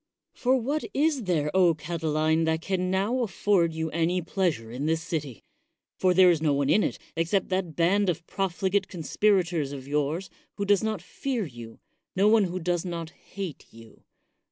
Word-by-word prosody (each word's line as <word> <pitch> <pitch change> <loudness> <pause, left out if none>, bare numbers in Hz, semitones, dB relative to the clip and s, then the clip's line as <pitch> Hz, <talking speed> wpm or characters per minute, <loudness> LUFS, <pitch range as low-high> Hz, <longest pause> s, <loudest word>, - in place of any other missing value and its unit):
For 255 +1 +2
what 275 +5 -1
is 290 -5 +1
there, 155 -5 0 0.3
Catiline, 160 0 0
that 160 0 +1
can 185 -1 -1
now 200 +7 0
afford 195 -5 +1
you 160 -1 -2
any 170 +3 +1
pleasure 165 - -1
in 135 +5 -3
this 160 0 0
city? 145 - -4 0.5
for 185 -1 +2
there 185 -1 +7
is 165 -3 0
no 155 -3 +2
one 140 0 +1
in 215 - +5
it, - - -1 0.2
except 170 +4 0
that 185 -4 -2
band 190 +4 +2
of 170 -1 -2
profligate 195 +1 -1
con 170 -4 -7
spirators 175 -7 +1
of 135 -2 -8
yours, 150 +5 -1 0.2
who 200 - -2
does 200 -1 +3
not 215 -5 -2
fear 245 +2 -3
you, 120 -5 -10 0.2
— - - -55
no 195 +2 +4
one 215 -1 +5
who 180 0 -4
does 175 0 -1
not 170 -3 -5
hate 190 -5 -8
you. 115 0 -16
175 Hz, 180 wpm, -27 LUFS, 160-195 Hz, 0.5 s, there